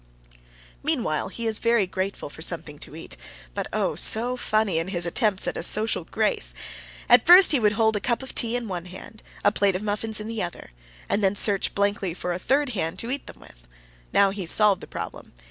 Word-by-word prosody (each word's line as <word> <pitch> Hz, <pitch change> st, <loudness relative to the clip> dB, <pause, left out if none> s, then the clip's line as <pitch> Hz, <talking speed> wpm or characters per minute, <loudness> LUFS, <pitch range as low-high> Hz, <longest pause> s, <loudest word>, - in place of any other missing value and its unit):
Meanwhile 255 Hz, -, -1 dB
he 230 Hz, +4 st, -6 dB
is 220 Hz, -1 st, +2 dB
very 230 Hz, -3 st, +2 dB
grateful 185 Hz, -4 st, -5 dB
for 160 Hz, -, -12 dB
something 160 Hz, -3 st, -3 dB
to 150 Hz, -, -8 dB
eat, 160 Hz, -, -8 dB, 0.4 s
but -, -, -4 dB
oh, -, -, -1 dB
so 240 Hz, +3 st, +4 dB
funny 215 Hz, -8 st, 0 dB
in 165 Hz, -, -3 dB
his 175 Hz, -3 st, -1 dB
attempts 195 Hz, +2 st, +1 dB
at -, -, -3 dB
social 215 Hz, -5 st, +1 dB
grace! -, -, -1 dB, 0.5 s
At 245 Hz, -1 st, +6 dB
first 365 Hz, +2 st, +9 dB
he 290 Hz, -, +4 dB
would 210 Hz, -2 st, +2 dB
hold 220 Hz, 0 st, +2 dB
a -, -, 0 dB
cup 235 Hz, +4 st, -2 dB
of 265 Hz, -, -7 dB
tea 230 Hz, 0 st, 0 dB
in 245 Hz, -2 st, -3 dB
one 180 Hz, -3 st, -5 dB
hand, 190 Hz, +4 st, -12 dB, 0.2 s
a 205 Hz, -, +5 dB
plate 200 Hz, -2 st, +1 dB
of 190 Hz, -, -4 dB
muffins 215 Hz, +1 st, 0 dB
in 210 Hz, -, -6 dB
the 225 Hz, -1 st, -3 dB
other, 175 Hz, -, -6 dB, 0.4 s
and 205 Hz, -, 0 dB
then 195 Hz, +1 st, +2 dB
search 200 Hz, -1 st, 0 dB
blankly 200 Hz, -3 st, 0 dB
for 180 Hz, -1 st, -3 dB
a 175 Hz, -, -4 dB
third 275 Hz, +7 st, +1 dB
hand 175 Hz, -8 st, -3 dB
to 235 Hz, -, -5 dB
eat 280 Hz, +1 st, -4 dB
them -, -, -11 dB
with. -, -, -18 dB, 0.4 s
Now 200 Hz, -1 st, +4 dB
he 200 Hz, 0 st, -6 dB
has 170 Hz, -, -1 dB
solved 210 Hz, -1 st, +5 dB
the -, -, -10 dB
problem. -, -, -8 dB
205 Hz, 215 wpm, -24 LUFS, 180-230 Hz, 0.5 s, first